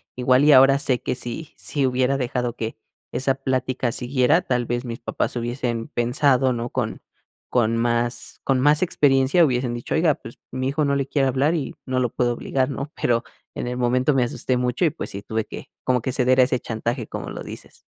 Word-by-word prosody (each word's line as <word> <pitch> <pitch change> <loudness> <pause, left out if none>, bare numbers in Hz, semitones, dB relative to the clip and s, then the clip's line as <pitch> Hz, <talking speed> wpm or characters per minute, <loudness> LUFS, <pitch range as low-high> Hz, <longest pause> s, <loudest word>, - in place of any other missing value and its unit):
igual 125 +2 +3
y 150 - +7
ahora 135 +1 +7
sé 130 -3 +1
que - - -1
si 125 +5 -6
si 140 -3 -1
hubiera 130 +1 +1
dejado 125 -1 -2
que 110 0 -5 0.3
esa 135 0 0
plática 130 -2 -1
siguiera, 125 +5 +2
tal 125 -1 0
vez 120 +2 -2
mis 115 -1 -6
papás 120 - -2
hubiesen 120 -1 -3
pensado, 130 +2 +2
¿no? 120 0 -3
Con - - -3 0.5
con 115 -2 +2
más 120 +1 -1
con 135 -2 +2
más 150 +3 +4
experiencia 140 -1 +3
hubiesen 125 -3 0
dicho: 120 - -4
"Oiga, 160 -2 +3
pues - - -12
mi 130 +1 -2
hijo 150 +2 0
no 140 - +1
le 140 -1 0
quiere 135 -1 +1
hablar 135 +5 +2
y 155 -6 -3
no 130 0 -1
lo 125 - +1
puedo 120 -1 +1
obligar, 130 +2 -1
¿no?" 140 +2 -5
Pero, 120 0 +1 0.3
en - - -3
el 125 - -3
momento 125 +3 +2
me 130 -2 +3
asusté 125 +1 -1
mucho 125 +4 -1
y, 165 - +5
pues 155 - -6
sí, 100 - -6
tuve 110 +1 -3
que, - - -9 0.2
como 125 -1 +2
que 130 +2 -2
ceder 130 0 +3
a - - +7
ese 125 - +1
chantaje, 115 +1 -3
como - - -6
lo - - -6
dices. - - -10
130 Hz, 210 wpm, -23 LUFS, 120-135 Hz, 0.5 s, y